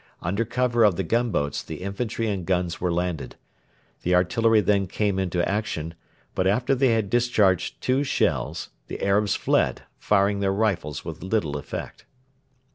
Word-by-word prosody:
Under 100 Hz, +7 st, -1 dB
cover 120 Hz, 0 st, +1 dB
of 105 Hz, -4 st, +5 dB
the 95 Hz, -, -1 dB
gunboats 95 Hz, -, 0 dB
the 80 Hz, +2 st, -8 dB
infantry 115 Hz, +3 st, -2 dB
and 100 Hz, -4 st, -2 dB
guns 90 Hz, -1 st, -1 dB
were 90 Hz, -1 st, +1 dB
landed. 85 Hz, -2 st, -2 dB, 0.7 s
The 90 Hz, +1 st, +2 dB
artillery 110 Hz, +5 st, +3 dB
then 100 Hz, -1 st, +2 dB
came 100 Hz, +1 st, 0 dB
into 90 Hz, -2 st, 0 dB
action, 85 Hz, -6 st, -2 dB, 0.4 s
but 95 Hz, -, +1 dB
after 120 Hz, +7 st, +2 dB
they 135 Hz, 0 st, +3 dB
had 115 Hz, -4 st, +2 dB
discharged 110 Hz, -7 st, +2 dB
two 130 Hz, +2 st, +2 dB
shells, 140 Hz, -, -1 dB, 0.2 s
the -, -, -6 dB
Arabs 100 Hz, +1 st, +2 dB
fled, -, -, +1 dB, 0.2 s
firing 100 Hz, 0 st, +2 dB
their 95 Hz, -1 st, +1 dB
rifles 95 Hz, -9 st, -1 dB
with 80 Hz, -1 st, -7 dB
little 95 Hz, -6 st, -1 dB
effect. 70 Hz, -, -6 dB
100 Hz, 155 wpm, -25 LUFS, 90-115 Hz, 0.7 s, of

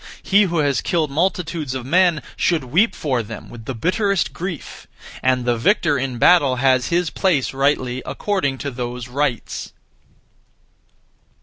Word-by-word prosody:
He 200 Hz, +1 st, +4 dB
who 170 Hz, -2 st, -2 dB
has 145 Hz, -3 st, +1 dB
killed 160 Hz, -5 st, 0 dB
multitudes 165 Hz, -3 st, -1 dB
of 130 Hz, -2 st, -5 dB
men 175 Hz, +2 st, +3 dB
should 165 Hz, -5 st, +1 dB
weep 170 Hz, -, +2 dB
for 130 Hz, -5 st, -1 dB
them 110 Hz, 0 st, -9 dB
with 115 Hz, -2 st, -11 dB
the 130 Hz, -, -4 dB
bitterest 195 Hz, -, 0 dB
grief; 175 Hz, -4 st, -7 dB, 0.3 s
and 130 Hz, -1 st, +1 dB
the 120 Hz, -1 st, +2 dB
victor 165 Hz, -, +2 dB
in 130 Hz, -2 st, -2 dB
battle 140 Hz, -2 st, +5 dB
has 130 Hz, -1 st, +2 dB
his 175 Hz, -1 st, 0 dB
place 165 Hz, -11 st, +1 dB
(rightly) 135 Hz, -2 st, 0 dB
according 185 Hz, -10 st, -2 dB
to 140 Hz, -, -2 dB
those 125 Hz, -1 st, -5 dB
rites. 130 Hz, -2 st, -3 dB
145 Hz, 145 wpm, -20 LUFS, 130-175 Hz, 0.3 s, battle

